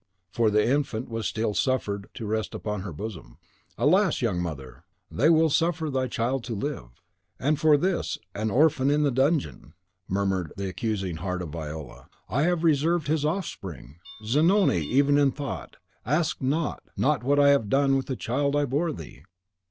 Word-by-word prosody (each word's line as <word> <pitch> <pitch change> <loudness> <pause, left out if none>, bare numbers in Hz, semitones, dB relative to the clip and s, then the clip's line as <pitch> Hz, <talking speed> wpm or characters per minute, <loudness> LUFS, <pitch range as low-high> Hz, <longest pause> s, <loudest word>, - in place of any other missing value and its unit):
for 115 -2 +2
the 105 +1 +2
infant 130 -3 -1
was 115 -1 -2
still 110 -1 -1
suffered 100 -6 -1
to 115 - -6
rest 110 +1 -2
upon 105 -2 -4
her 100 -1 -6
bosom. 80 - -8 0.4
"Alas, 185 +4 +3
young 105 -8 0
mother, 70 -7 -7 0.3
they 145 +7 +3
will 160 0 +5
suffer 165 -1 +1
thy 130 -1 0
child 125 +2 -1
to 120 -2 -4
live.' 100 - -5 0.4
"And 150 +2 +1
for 150 -1 +5
this, 180 +3 -1 0.2
an 110 +2 -2
orphan 135 +2 +3
in 150 +1 +2
the 145 - +2
dungeon!" 135 +4 0 0.3
murmured 95 -4 -1
the 100 0 -3
accusing 95 -2 -3
heart 90 +1 -3
of 85 - -6
Viola, 80 -1 -8 0.2
"have 170 +6 +1
I - - -6
reserved 160 0 +2
his 155 -1 +1
offspring! 95 - -4 0.3
Zanoni, 160 - +3
even 140 - +3
in 140 -1 +4
thought, 140 +1 -6 0.3
ask 150 +6 0
not 150 +5 -1
ask - - -34
not 140 -3 +1
what 145 +3 +2
I 140 0 +6
have 140 -8 +3
done 135 +1 +3
with 135 - -1
the 130 - -2
child 140 +5 -1
I 145 0 +2
bore 145 +6 0
thee!" 80 - -10
130 Hz, 175 wpm, -26 LUFS, 100-150 Hz, 0.4 s, I